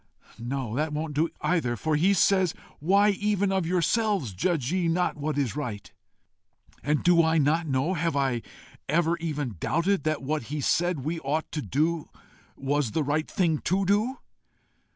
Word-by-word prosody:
No, 120 Hz, -1 st, -3 dB
that 150 Hz, +2 st, -1 dB
won't 155 Hz, 0 st, -3 dB
do 160 Hz, +3 st, +1 dB
either, 150 Hz, -7 st, +1 dB
for 155 Hz, +8 st, -1 dB
he 175 Hz, +7 st, +3 dB
says, 190 Hz, -1 st, +3 dB, 0.2 s
Why 200 Hz, +6 st, +4 dB
even 200 Hz, -1 st, 0 dB
of 190 Hz, -3 st, 0 dB
yourselves 185 Hz, -, +1 dB
judge 145 Hz, -, 0 dB
ye 180 Hz, -2 st, +1 dB
not 175 Hz, +2 st, +1 dB
what 150 Hz, -1 st, -3 dB
is 135 Hz, -5 st, 0 dB
right? 120 Hz, -9 st, -5 dB, 0.9 s
And 150 Hz, 0 st, 0 dB
do 175 Hz, -1 st, +5 dB
I 160 Hz, 0 st, +2 dB
not 155 Hz, +3 st, +2 dB
know 135 Hz, +6 st, 0 dB
have 165 Hz, -3 st, -1 dB
I 135 Hz, -4 st, +1 dB, 0.5 s
ever 165 Hz, +2 st, +2 dB
even 150 Hz, -, -3 dB
doubted 180 Hz, -, +1 dB
that 155 Hz, -2 st, -1 dB
what 150 Hz, -1 st, -2 dB
he 150 Hz, +1 st, -3 dB
said 175 Hz, +2 st, +1 dB
we 160 Hz, +5 st, -3 dB
ought 155 Hz, +2 st, -2 dB
to 155 Hz, -, -3 dB
do 155 Hz, +4 st, 0 dB, 0.5 s
was 135 Hz, -3 st, -1 dB
the 160 Hz, -, +1 dB
right 150 Hz, +2 st, -1 dB
thing 165 Hz, -5 st, +1 dB
to 190 Hz, +3 st, 0 dB
do? 215 Hz, +7 st, +1 dB
155 Hz, 170 wpm, -27 LUFS, 145-175 Hz, 0.9 s, do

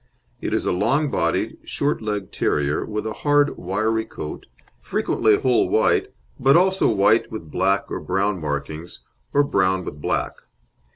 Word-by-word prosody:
It -, -, -3 dB
is -, -, 0 dB
a -, -, +1 dB
long 125 Hz, +11 st, +1 dB
bodied, 85 Hz, 0 st, -1 dB
short 145 Hz, -2 st, -1 dB
legged 105 Hz, -3 st, -4 dB
terrier, 75 Hz, 0 st, 0 dB
with 105 Hz, 0 st, -4 dB
a 110 Hz, -, -3 dB
hard, 145 Hz, 0 st, +3 dB
wiry 110 Hz, +5 st, -1 dB
coat, 75 Hz, -, -8 dB, 0.3 s
frequently 110 Hz, -2 st, +1 dB
whole 125 Hz, -3 st, +2 dB
white, -, -, +2 dB, 0.3 s
but 135 Hz, +3 st, +5 dB
also 190 Hz, +2 st, +3 dB
white 110 Hz, +1 st, +3 dB
with 80 Hz, -9 st, -7 dB
black 95 Hz, +1 st, +1 dB
or -, -, -2 dB
brown 95 Hz, 0 st, -1 dB
markings 75 Hz, +3 st, -5 dB, 0.3 s
or 145 Hz, -, +4 dB
brown 95 Hz, -8 st, +1 dB
with 75 Hz, -, -7 dB
black. -, -, -1 dB
105 Hz, 155 wpm, -22 LUFS, 90-125 Hz, 0.3 s, but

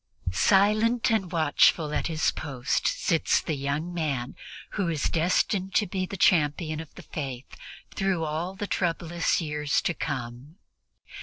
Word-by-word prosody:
Silent 215 Hz, -, +3 dB
and 195 Hz, -6 st, 0 dB
watchful 155 Hz, -1 st, +3 dB
at -, -, 0 dB
his 160 Hz, -1 st, +1 dB
post 135 Hz, -3 st, -2 dB
sits 165 Hz, -, +2 dB
the 160 Hz, -, -3 dB
young 145 Hz, +5 st, -2 dB
man 140 Hz, -8 st, -2 dB, 0.4 s
who 200 Hz, -4 st, -1 dB
is 155 Hz, -3 st, -2 dB
destined 185 Hz, +3 st, +1 dB
to 210 Hz, -, +4 dB
be 185 Hz, 0 st, -3 dB
the 195 Hz, -, -6 dB
champion 155 Hz, -2 st, +2 dB
of 160 Hz, -2 st, -8 dB
the -, -, -11 dB
Faith 135 Hz, -4 st, -6 dB, 0.4 s
through 190 Hz, -4 st, 0 dB
all 160 Hz, +5 st, -3 dB
the 205 Hz, -, -4 dB
troublous 170 Hz, -3 st, 0 dB
years 150 Hz, -2 st, 0 dB
to 175 Hz, -, -1 dB
come. 130 Hz, +1 st, -5 dB
165 Hz, 145 wpm, -27 LUFS, 150-185 Hz, 0.4 s, to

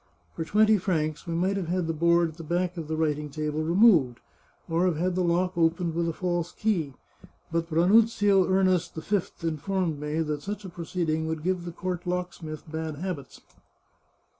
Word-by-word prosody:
For 165 Hz, -, -2 dB
twenty 215 Hz, +4 st, +4 dB
francs 155 Hz, -3 st, -1 dB
we 165 Hz, -, -2 dB
might 190 Hz, +4 st, +1 dB
have 185 Hz, -4 st, -3 dB
had 180 Hz, 0 st, 0 dB
the 165 Hz, -, -1 dB
board 170 Hz, +1 st, +3 dB
at 160 Hz, -, -14 dB
the 165 Hz, -, -8 dB
back 175 Hz, +3 st, -1 dB
of 165 Hz, -3 st, -5 dB
the 160 Hz, -, -2 dB
writ 155 Hz, -2 st, 0 dB
ing 150 Hz, 0 st, -6 dB
table 155 Hz, +1 st, -2 dB
removed, 170 Hz, -, +4 dB, 0.5 s
or 165 Hz, +2 st, +1 dB
have 170 Hz, -4 st, 0 dB
had 180 Hz, +3 st, 0 dB
the 180 Hz, +1 st, 0 dB
lock 180 Hz, +2 st, +1 dB
opened 170 Hz, 0 st, +1 dB
with 170 Hz, 0 st, 0 dB
a -, -, 0 dB
false 175 Hz, 0 st, -2 dB
key. 170 Hz, -11 st, -1 dB, 0.6 s
But 165 Hz, 0 st, -1 dB
Ranuzio 200 Hz, +2 st, +4 dB
Ernest 185 Hz, -2 st, +2 dB
V 175 Hz, 0 st, -2 dB
informed 165 Hz, 0 st, -1 dB
me 150 Hz, +2 st, -2 dB
that 150 Hz, -2 st, -2 dB
such 205 Hz, +2 st, -5 dB
a -, -, -6 dB
pro 170 Hz, -1 st, -7 dB
ceeding 160 Hz, -3 st, -1 dB
would 160 Hz, -1 st, -3 dB
give 180 Hz, -1 st, -1 dB
the 175 Hz, -, -5 dB
court 180 Hz, +1 st, -4 dB
locksmith 175 Hz, -4 st, -4 dB
bad 160 Hz, -1 st, -3 dB
habits. 155 Hz, -4 st, -6 dB
170 Hz, 190 wpm, -27 LUFS, 160-185 Hz, 0.6 s, twenty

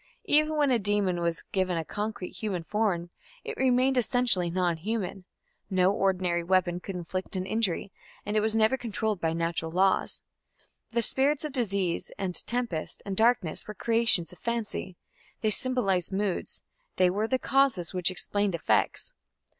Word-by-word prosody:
Even 305 Hz, +1 st, +3 dB
when 290 Hz, -2 st, +3 dB
a 240 Hz, -, +3 dB
demon 205 Hz, -3 st, +1 dB
was 170 Hz, -1 st, -1 dB
given 185 Hz, -4 st, 0 dB
concrete 205 Hz, +1 st, -4 dB
human 195 Hz, -6 st, -4 dB
form 180 Hz, -3 st, -1 dB, 0.3 s
it -, -, -5 dB
remained 260 Hz, 0 st, +3 dB
essentially 240 Hz, -8 st, +2 dB
non 175 Hz, -1 st, 0 dB
human: 195 Hz, 0 st, -4 dB, 0.4 s
no 185 Hz, -1 st, +3 dB
ordinary 185 Hz, -3 st, +1 dB
weapon 180 Hz, 0 st, +1 dB
could 190 Hz, +1 st, -7 dB
inflict 185 Hz, +2 st, -4 dB
an 185 Hz, 0 st, -2 dB
injury, 200 Hz, -2 st, -1 dB, 0.3 s
and 210 Hz, -, -3 dB
it -, -, +4 dB
was 220 Hz, +1 st, +2 dB
never 220 Hz, +4 st, +3 dB
controlled 220 Hz, -5 st, -2 dB
by 160 Hz, -, +1 dB
natural 165 Hz, 0 st, -2 dB
laws. 190 Hz, +3 st, +1 dB, 0.7 s
The 235 Hz, 0 st, +1 dB
spirits 280 Hz, +5 st, +3 dB
of 300 Hz, -, -4 dB
disease 200 Hz, -9 st, 0 dB
and 190 Hz, -2 st, -3 dB
tempest 235 Hz, -9 st, -2 dB
and 200 Hz, -1 st, -3 dB
darkness 220 Hz, -6 st, +1 dB
were 210 Hz, -, -7 dB
creations 225 Hz, -6 st, +3 dB
of 175 Hz, -, -17 dB
fancy: 220 Hz, -5 st, -3 dB, 0.4 s
they 215 Hz, -, +1 dB
symbolized 200 Hz, -7 st, 0 dB
moods; 195 Hz, -1 st, -2 dB, 0.3 s
they 180 Hz, -1 st, +3 dB
were 210 Hz, +4 st, -1 dB
the 260 Hz, -, +1 dB
causes 265 Hz, -, +1 dB
which 180 Hz, -1 st, +2 dB
explained 200 Hz, +1 st, -1 dB
effects. 165 Hz, -, +1 dB
195 Hz, 155 wpm, -28 LUFS, 180-230 Hz, 0.7 s, it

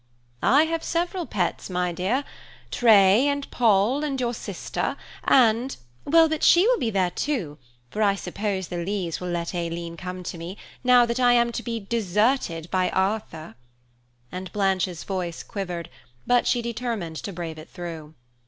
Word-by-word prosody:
"I 285 Hz, +4 st, +5 dB
have 325 Hz, 0 st, -2 dB
several 345 Hz, +1 st, -2 dB
pets, 180 Hz, -2 st, -2 dB
my 180 Hz, -1 st, -1 dB
dear–Tray, 215 Hz, +1 st, +2 dB
and 285 Hz, -1 st, -2 dB
Poll, 230 Hz, +4 st, +3 dB
and 275 Hz, -3 st, -2 dB
your 240 Hz, -1 st, 0 dB
sister, -, -, -4 dB, 0.3 s
and–" 245 Hz, +1 st, +3 dB, 0.3 s
"Well, 325 Hz, +2 st, +6 dB
but 315 Hz, -1 st, -2 dB
she 350 Hz, +3 st, +6 dB
will -, -, +3 dB
be 230 Hz, -, 0 dB
there, 190 Hz, -4 st, +1 dB
too, 180 Hz, -, -3 dB, 0.3 s
for 215 Hz, -, -3 dB
I 200 Hz, -2 st, +4 dB
suppose 200 Hz, -2 st, -3 dB
the 175 Hz, -, -4 dB
Lees 185 Hz, -3 st, -2 dB
will 180 Hz, -, -5 dB
let 170 Hz, 0 st, -3 dB
Aileen 170 Hz, -1 st, -4 dB
come 180 Hz, +1 st, -6 dB
to 170 Hz, -, -6 dB
me, 175 Hz, +4 st, -7 dB, 0.3 s
now 250 Hz, -1 st, +6 dB
that 235 Hz, +1 st, -2 dB
I 245 Hz, -1 st, +5 dB
am 235 Hz, 0 st, +3 dB
to 235 Hz, -, -4 dB
be 230 Hz, -1 st, -3 dB
deserted 210 Hz, -, 0 dB
by 185 Hz, -1 st, +2 dB
Arthur," 190 Hz, -, -2 dB, 0.8 s
and 185 Hz, 0 st, -6 dB
Blanche's 190 Hz, -4 st, 0 dB
voice 180 Hz, -4 st, -4 dB
quivered, 180 Hz, -4 st, -5 dB, 0.4 s
but 245 Hz, -1 st, +3 dB
she 240 Hz, -1 st, +1 dB
determined 230 Hz, -8 st, -3 dB
to 200 Hz, -, -5 dB
brave 165 Hz, -3 st, -6 dB
it 155 Hz, -, -12 dB
through. 165 Hz, -3 st, -8 dB
200 Hz, 160 wpm, -25 LUFS, 175-245 Hz, 0.8 s, Well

